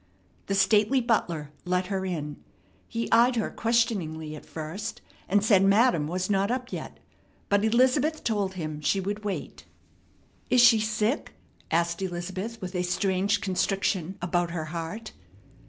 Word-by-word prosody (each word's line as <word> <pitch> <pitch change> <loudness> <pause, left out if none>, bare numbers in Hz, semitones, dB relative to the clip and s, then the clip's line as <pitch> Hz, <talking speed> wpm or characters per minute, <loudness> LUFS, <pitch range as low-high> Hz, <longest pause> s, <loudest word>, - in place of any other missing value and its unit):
The 195 - 0
stately 210 +6 +4
butler 175 - 0
let 180 +1 0
her 190 0 -2
in. 150 -5 -4 0.5
He 230 -1 -3
eyed 240 +2 +5
her 225 - -1
questioningly 185 -10 0
at 150 - -12
first, 175 +8 -5 0.3
and 205 +2 +3
said 200 -3 +5
madam 195 -5 +4
was 180 +3 -2
not 200 0 +1
up 250 +1 -2
yet; - - -6 0.5
but 200 0 +3
Elizabeth 260 +7 +2
told 200 -4 -1
him 155 -3 -5
she 195 +6 +1
would 205 +3 -3
wait. 205 -2 -5 0.8
"Is 250 - +4
she 235 -2 +7
sick?" 215 +4 -1 0.3
asked 170 +2 0
Elizabeth 190 +5 -4
with 185 -2 -6
a 180 - 0
strange 190 +3 +1
constriction 190 -2 -1
about 175 0 0
her 165 -2 -3
heart. 175 +7 -5
195 Hz, 145 wpm, -27 LUFS, 175-225 Hz, 0.8 s, she